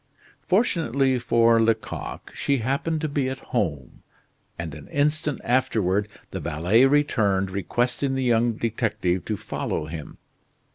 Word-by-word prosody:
Fortunately 140 - +2
for 115 -1 +4
Lecoq, 110 0 -2
she 140 - 0
happened 140 +6 -1
to 155 - 0
be 140 -3 -1
at 130 - -4 0.2
home, 75 - -2 0.6
and 85 -3 -5
an 75 -1 -10
instant 150 +1 0
afterward 105 -5 +1 0.2
the - - -4
valet 90 - +3
returned 105 -10 +2
requesting 120 +8 -1
the 130 - -1
young 120 -1 +3
detective 110 -6 -1
to 105 - -2
follow 100 -6 -3
him. 75 -1 -8
115 Hz, 130 wpm, -24 LUFS, 95-135 Hz, 0.6 s, for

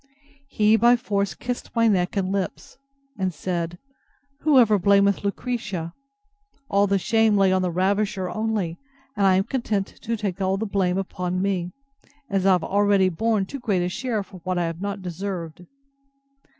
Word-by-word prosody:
He 215 -4 +3
by 240 +2 +5
force 200 -7 -2
kissed 245 0 -5
my 230 0 +4
neck 185 -3 +1
and 190 -1 0
lips; 195 +6 -4 0.4
and 190 -1 0
said, 170 0 -3 0.6
Whoever 250 -10 +4
blamed 200 +1 +3
Lucretia? 200 -6 -3 0.8
All 200 +1 +3
the 200 0 +2
shame 220 +1 +2
lay 195 -1 +4
on 185 0 +2
the 180 - 0
ravisher 195 +2 0
only 210 -5 -2 0.4
and 200 -2 +3
I 190 - +5
am 190 - +3
content 215 -4 -1 0.2
to 230 +1 -2
take 200 -3 -3
all 190 0 +1
the 220 - -2
blame 190 -3 0
upon 185 -1 -3
me, 185 -2 -1 0.6
as 195 -1 +1
I 190 - +6
have 180 -3 +1
already 200 -1 +3
borne 215 +3 0
too 275 +8 -7
great 200 -7 0
a 180 - -1
share 215 +1 -2
for 190 -1 -13
what 185 +1 -3
I 175 - +1
have 165 +1 -5
not 200 -1 -4
deserved. 175 -2 -5
195 Hz, 170 wpm, -24 LUFS, 185-215 Hz, 0.8 s, I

